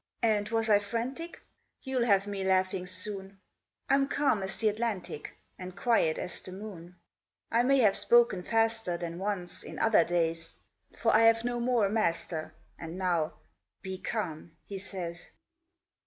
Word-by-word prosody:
And 210 Hz, -2 st, +2 dB
was 225 Hz, 0 st, +1 dB
I 205 Hz, -2 st, +6 dB
frantic? 240 Hz, +11 st, -4 dB, 0.4 s
You'll 260 Hz, -3 st, 0 dB
have 200 Hz, -3 st, +3 dB
me 200 Hz, -1 st, -4 dB
laughing 185 Hz, -1 st, +1 dB
soon. 190 Hz, +1 st, -5 dB, 0.5 s
I'm 275 Hz, 0 st, +3 dB
calm 275 Hz, -7 st, +1 dB
as 190 Hz, 0 st, -4 dB
this 215 Hz, -1 st, +3 dB
Atlantic, 210 Hz, -8 st, -4 dB, 0.2 s
And 185 Hz, +1 st, -8 dB
quiet 200 Hz, -8 st, +2 dB
as -, -, -2 dB
the 185 Hz, -, -9 dB
moon; 185 Hz, -3 st, -9 dB, 0.6 s
I 230 Hz, -, +4 dB
may 275 Hz, +3 st, +4 dB
have 205 Hz, -4 st, +5 dB
spoken 235 Hz, -6 st, +4 dB
faster 225 Hz, -3 st, +1 dB
Than 170 Hz, 0 st, -5 dB
once, 190 Hz, -3 st, -3 dB
in -, -, -8 dB
other 225 Hz, -6 st, +4 dB
days; 165 Hz, -1 st, -1 dB, 0.4 s
For 225 Hz, -, +2 dB
I've 225 Hz, +1 st, +5 dB
no 240 Hz, 0 st, -1 dB
more 240 Hz, -3 st, +2 dB
a -, -, 0 dB
master, 170 Hz, -6 st, -1 dB, 0.2 s
And 165 Hz, +1 st, -7 dB
now 175 Hz, -4 st, 0 dB, 0.5 s
'Be 190 Hz, -1 st, -5 dB
calm,' 170 Hz, -8 st, -4 dB
he 200 Hz, -1 st, -6 dB
says. 175 Hz, -4 st, -6 dB
200 Hz, 155 wpm, -30 LUFS, 180-225 Hz, 0.6 s, I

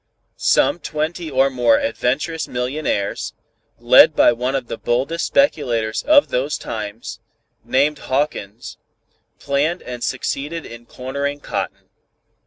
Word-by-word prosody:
Some 150 Hz, -, +2 dB
twenty 160 Hz, +2 st, -3 dB
or 135 Hz, 0 st, +2 dB
more 120 Hz, -3 st, +3 dB
adventurous 150 Hz, +8 st, -1 dB
millionaires, 125 Hz, -5 st, -2 dB, 0.4 s
led -, -, +6 dB
by -, -, +6 dB
one 125 Hz, +3 st, -2 dB
of 135 Hz, -, -2 dB
the 115 Hz, -, -6 dB
boldest 135 Hz, +8 st, -1 dB
speculators 120 Hz, -, +1 dB
of 295 Hz, -1 st, +4 dB
those 135 Hz, +4 st, -1 dB
times, 110 Hz, +1 st, -6 dB, 0.4 s
named 145 Hz, +3 st, +1 dB
Hawkins, 130 Hz, -6 st, -3 dB, 0.6 s
planned 145 Hz, +5 st, -1 dB
and 125 Hz, -1 st, -7 dB
succeeded 150 Hz, +4 st, -3 dB
in 115 Hz, 0 st, -11 dB
cornering 140 Hz, +3 st, -4 dB
cotton. -, -, -5 dB
135 Hz, 115 wpm, -20 LUFS, 120-150 Hz, 0.6 s, led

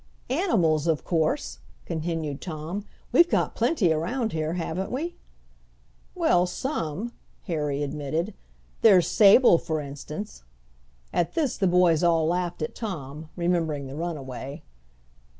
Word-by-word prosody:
"Animals 175 Hz, -, +2 dB
of 155 Hz, -5 st, +1 dB
course," 155 Hz, -, 0 dB, 0.3 s
continued 160 Hz, -3 st, -3 dB
Tom; 170 Hz, +4 st, -5 dB, 0.3 s
"we've 340 Hz, +8 st, +6 dB
got -, -, +1 dB
plenty 195 Hz, -, +2 dB
around 220 Hz, +9 st, -1 dB
here, 155 Hz, 0 st, -2 dB
haven't 180 Hz, +2 st, -3 dB
we?" 320 Hz, +8 st, -3 dB, 1.0 s
"Well, 180 Hz, 0 st, +3 dB
some," 195 Hz, -, -3 dB, 0.3 s
Harry 150 Hz, -5 st, -1 dB
admitted. 150 Hz, +7 st, -2 dB, 0.5 s
"There's 190 Hz, -6 st, +7 dB
Sable, 205 Hz, -3 st, +6 dB
for 160 Hz, -1 st, -2 dB
instance." 150 Hz, +8 st, -7 dB, 0.7 s
At 175 Hz, -, 0 dB
this 305 Hz, -7 st, +1 dB
the 195 Hz, -, +1 dB
boys 175 Hz, -2 st, +4 dB
all 165 Hz, -2 st, +3 dB
laughed 175 Hz, 0 st, -1 dB
at 155 Hz, -, -3 dB
Tom, 155 Hz, -, -6 dB
remembering 170 Hz, -5 st, 0 dB
the 135 Hz, +1 st, -7 dB
runaway. 145 Hz, -3 st, -5 dB
165 Hz, 120 wpm, -26 LUFS, 155-195 Hz, 1.0 s, There's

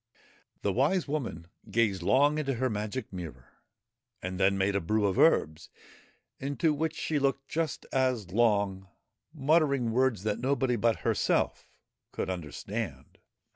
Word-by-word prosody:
The 100 Hz, -, +1 dB
Wise 150 Hz, -, +2 dB
Woman 130 Hz, -, -3 dB, 0.2 s
gazed 110 Hz, -5 st, +1 dB
long 145 Hz, -, +3 dB
into 135 Hz, -3 st, -1 dB
her 130 Hz, +1 st, 0 dB
magic 105 Hz, +3 st, -4 dB
mirror, 80 Hz, -9 st, -8 dB, 0.7 s
and 95 Hz, 0 st, -5 dB
then 100 Hz, 0 st, +3 dB
made 100 Hz, +1 st, +1 dB
a 100 Hz, -, +1 dB
brew 105 Hz, +5 st, +1 dB
of 95 Hz, -2 st, 0 dB
herbs, 80 Hz, 0 st, +3 dB, 0.7 s
into 145 Hz, +3 st, 0 dB
which 155 Hz, +1 st, -2 dB
she 155 Hz, -2 st, -1 dB
looked 135 Hz, 0 st, 0 dB
just 160 Hz, -3 st, -2 dB
as 130 Hz, -8 st, 0 dB
long, 100 Hz, -3 st, +1 dB, 0.4 s
muttering 140 Hz, -5 st, +2 dB
words 125 Hz, -4 st, +1 dB
that 105 Hz, -1 st, -1 dB
nobody 130 Hz, -1 st, +1 dB
but 115 Hz, 0 st, +1 dB
herself -, -, 0 dB, 0.4 s
could -, -, -3 dB
understand. 85 Hz, -5 st, -6 dB
115 Hz, 135 wpm, -29 LUFS, 95-140 Hz, 0.7 s, long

